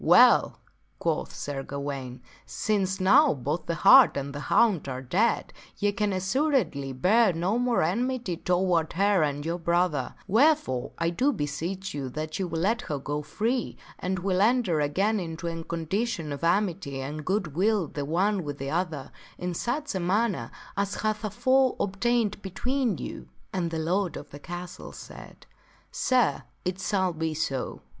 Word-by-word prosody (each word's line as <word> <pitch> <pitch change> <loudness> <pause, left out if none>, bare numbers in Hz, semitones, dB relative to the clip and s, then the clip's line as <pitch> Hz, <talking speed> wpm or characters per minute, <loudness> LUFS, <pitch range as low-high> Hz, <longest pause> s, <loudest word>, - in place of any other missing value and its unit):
"Well," - - +6 0.4
quoth - - -1
Sir 145 -2 -4
Gawaine, 135 -3 -5 0.2
" - - -30
since 195 -3 -1
now 265 - +5
both 145 +5 -3
the 170 - -1
hart 260 - +8
and 140 0 -4
the 145 - -5
hound 195 -11 +3
are 130 0 -5
dead, 195 - +1 0.2
ye 205 -1 +1
can 210 0 0
assuredly 190 - 0
bear 190 - +3
no 180 +8 0
more 245 -5 +2
enmity 230 +1 -1
toward 180 -2 +1
her 200 0 +3
and 145 -1 -1
your 170 +2 -2
brother, 170 -5 0
wherefore 215 - +2
I 170 0 0
do 260 +11 +2
beseech 175 - -4
you 140 -3 -4
that 155 +5 -5
you 190 - -1
will 165 -1 -3
let 225 +6 +1
her 150 - -3
go 145 +2 -3
free, 225 - -2 0.2
and 185 +1 -2
will 185 0 0
enter 215 -7 +3
again 195 +9 +1
into 165 -1 -6
a 165 -1 -4
condition 170 0 -2
of 140 - -7
amity 170 -6 0
and 150 +3 -5
good 185 -4 -1
will 200 +3 +2
the 145 - -5
one 185 +6 +1
with 145 -2 -5
the 135 0 -4
other, 160 -5 -2 0.3
in 180 0 -3
such 265 - -2
a 190 - -1
manner 185 - 0 0.3
as 200 0 -1
hath 215 0 -1
afore 255 +5 +2
ob 195 0 -2
tained 235 -3 +1
between 235 - -1
you." 65 - -7 0.3
And 180 -3 -1
the 165 - -3
lord 175 +2 0
of 145 - -10
the 145 - -9
castle 175 +3 -8
said, - - -12 0.3
" - - -32
Sir, 245 - +2 0.2
it 180 +1 -2
shall 190 -1 +1
be 160 0 -2
so." 135 -4 -3
180 Hz, 170 wpm, -27 LUFS, 155-210 Hz, 0.4 s, hart